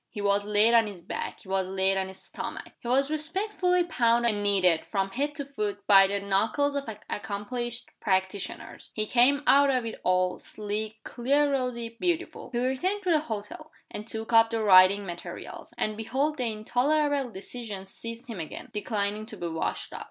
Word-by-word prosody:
He - - -8
was 200 0 +1
laid 210 +2 +4
on 230 -2 +5
his 200 -3 -7
back; - - -5
he - - -16
was 190 -1 0
laid 190 0 +1
on 190 0 -1
his 190 0 -8
stomach; - - -7
he 240 - -9
was 275 +4 +2
respectfully 360 +3 +1
pounded 235 -7 +2
and 205 - -3
kneaded, 185 -5 +3
from 195 -2 -2
head 290 +6 -2
to 285 -2 -4
foot, 210 -7 -4
by 195 -2 +7
the 200 +1 -1
knuckles 215 +9 +1
of 280 -4 -2 0.2
accomplished 240 +4 -4
practitioners. 190 -1 -2
He 215 - 0
came 255 +5 +4
out 280 0 +6
of 255 -3 +1
it 225 - -6
all, 185 0 +1
sleek, 215 +1 -5
clear 280 +4 +1
rosy, 235 -4 -2
beautiful. 350 -1 -2
He 240 - -2
returned 265 +12 0
to 365 - +1
the 315 - +5
hotel, 235 +3 -6 0.2
and 210 - -7
took 225 +1 -5
up 225 0 +7
the 225 -1 -1
writing 195 0 +6
materials 175 -2 -7
and 215 - -1
behold 270 +8 -1
the 240 -3 +1
intolerable 275 +6 +1
indecision 210 -2 -7
seized 230 +5 -7
him 230 -7 -7
again, 160 - -7
declining 210 0 -2
to 215 - -9
be 170 -2 -4
washed 160 0 -3
out! - - -5
225 Hz, 185 wpm, -27 LUFS, 200-270 Hz, 0.2 s, by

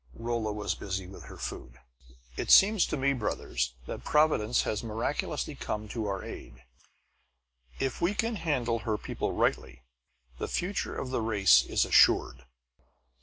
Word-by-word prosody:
Rolla 115 - -2
was 105 0 -2
busy 95 -1 -4
with 95 +2 -11
her - - -11
food. 60 - -7 0.6
"It - - -4
seems 205 0 +6
to - - -2
me, 140 +1 +2
brothers, - - -2
that - - -7
Providence 150 -7 +2
has 105 0 -2
miraculously 115 0 -3
come 105 0 -5
to 110 -2 -3
our 100 -1 -3
aid. 65 - -10 1.1
If 135 - -3
we 180 +4 +1
can 225 0 -1
handle 125 -9 -1
her 110 -2 -2
people - - -3
rightly 60 -2 -1 0.6
the - - -3
future 185 +3 -2
of 130 - -4
the 130 - -1
race 105 -4 +5
is - - +1
assured." 65 +1 +4
115 Hz, 150 wpm, -29 LUFS, 100-140 Hz, 1.1 s, seems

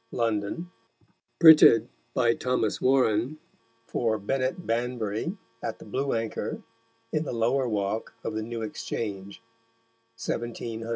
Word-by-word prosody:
London: 115 - -2 0.7
Printed 155 -8 +8 0.3
by 120 -2 +4
Tho. 125 -2 0
Warren, 130 +1 +2 0.5
for 115 -2 0
Bennet 130 - -2
Banbury, 120 - -2 0.2
at 110 - -4
the - - -13
Blue 135 +6 -1
Anchor, 115 -1 -3 0.5
in 155 - +1
the - - -4
Lower 120 +3 +1
Walk 105 0 -2
of 115 - -3
the 110 - -2
New 115 +1 -5
Exchange_, 100 -2 -5 0.8
1700. 115 0 -4
115 Hz, 115 wpm, -27 LUFS, 110-130 Hz, 0.8 s, Printed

